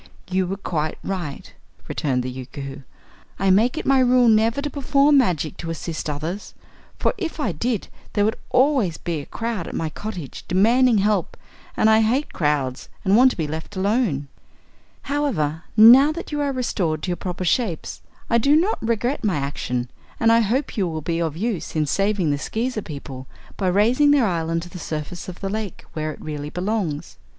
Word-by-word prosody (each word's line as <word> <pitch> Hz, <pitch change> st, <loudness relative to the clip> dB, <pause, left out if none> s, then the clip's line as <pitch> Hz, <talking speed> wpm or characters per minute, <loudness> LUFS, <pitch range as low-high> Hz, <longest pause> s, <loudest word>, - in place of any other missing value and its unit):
"You 185 Hz, 0 st, +1 dB
were 195 Hz, +2 st, -3 dB
quite 155 Hz, -5 st, -2 dB
right," 175 Hz, -8 st, -5 dB, 0.3 s
returned 130 Hz, -4 st, -1 dB
the 130 Hz, -, -4 dB
Yookoohoo. 135 Hz, +2 st, -7 dB, 0.6 s
"I 195 Hz, -1 st, +2 dB
make 230 Hz, +10 st, +3 dB
it -, -, -3 dB
my 270 Hz, -1 st, +4 dB
rule 250 Hz, -1 st, +5 dB
never 225 Hz, +3 st, +3 dB
to 290 Hz, +1 st, -2 dB
perform 280 Hz, +1 st, +4 dB
magic 170 Hz, -, 0 dB
to 165 Hz, -, -6 dB
assist 165 Hz, -1 st, -4 dB
others, 160 Hz, +7 st, -5 dB, 0.4 s
for -, -, +1 dB
if 335 Hz, -4 st, -4 dB
I 230 Hz, -10 st, 0 dB
did 220 Hz, +7 st, -2 dB, 0.3 s
there 205 Hz, -1 st, +2 dB
would 220 Hz, +3 st, +1 dB
always 255 Hz, -, +2 dB
be 165 Hz, -4 st, -3 dB
crowd 230 Hz, -1 st, -4 dB
at -, -, -6 dB
my 160 Hz, -, -1 dB
cottage 180 Hz, -9 st, -7 dB
demanding 230 Hz, +6 st, +4 dB
help 205 Hz, -2 st, +1 dB, 0.4 s
and -, -, +4 dB
I 220 Hz, 0 st, +6 dB
hate 250 Hz, +7 st, 0 dB
crowds 145 Hz, -5 st, -1 dB, 0.2 s
and 195 Hz, +1 st, +4 dB
want 255 Hz, +3 st, +7 dB
to -, -, -6 dB
be 160 Hz, -, -1 dB
left 160 Hz, +6 st, -6 dB
alone." 190 Hz, -, 0 dB, 0.8 s
"However, 175 Hz, -, -1 dB
now 250 Hz, +7 st, +9 dB
that 340 Hz, -, -7 dB
you 295 Hz, 0 st, -1 dB
are 285 Hz, -1 st, 0 dB
restored 185 Hz, -, -1 dB
to -, -, -2 dB
your -, -, 0 dB
proper 180 Hz, 0 st, -4 dB
shapes, 180 Hz, -3 st, -1 dB, 0.3 s
I 235 Hz, -, +3 dB
do 280 Hz, +6 st, +4 dB
not 365 Hz, +8 st, +2 dB
regret 235 Hz, +4 st, -1 dB
my 205 Hz, -5 st, +1 dB
action 135 Hz, -3 st, -2 dB, 0.3 s
and 225 Hz, -1 st, +4 dB
I 230 Hz, -, +6 dB
hope 240 Hz, +6 st, 0 dB
you 195 Hz, -3 st, +1 dB
will 160 Hz, -2 st, -4 dB
be 165 Hz, +2 st, -1 dB
of 160 Hz, -2 st, -2 dB
use 195 Hz, -6 st, -3 dB
in 155 Hz, -1 st, +2 dB
saving 195 Hz, 0 st, +1 dB
the 145 Hz, -, -1 dB
Skeezer 225 Hz, -, -2 dB
people 140 Hz, -5 st, -8 dB, 0.3 s
by 190 Hz, -, -1 dB
raising 230 Hz, +10 st, +4 dB
their 285 Hz, -4 st, +5 dB
island 165 Hz, -3 st, -1 dB
to 175 Hz, -, -9 dB
the 180 Hz, -, -9 dB
surface 160 Hz, +3 st, -5 dB
of 180 Hz, -, -10 dB
the 195 Hz, -, -2 dB
lake, 210 Hz, -2 st, -5 dB
where 155 Hz, 0 st, -2 dB
it -, -, -11 dB
really 150 Hz, -1 st, -5 dB
belongs. 180 Hz, -4 st, -3 dB
195 Hz, 190 wpm, -22 LUFS, 155-235 Hz, 0.8 s, now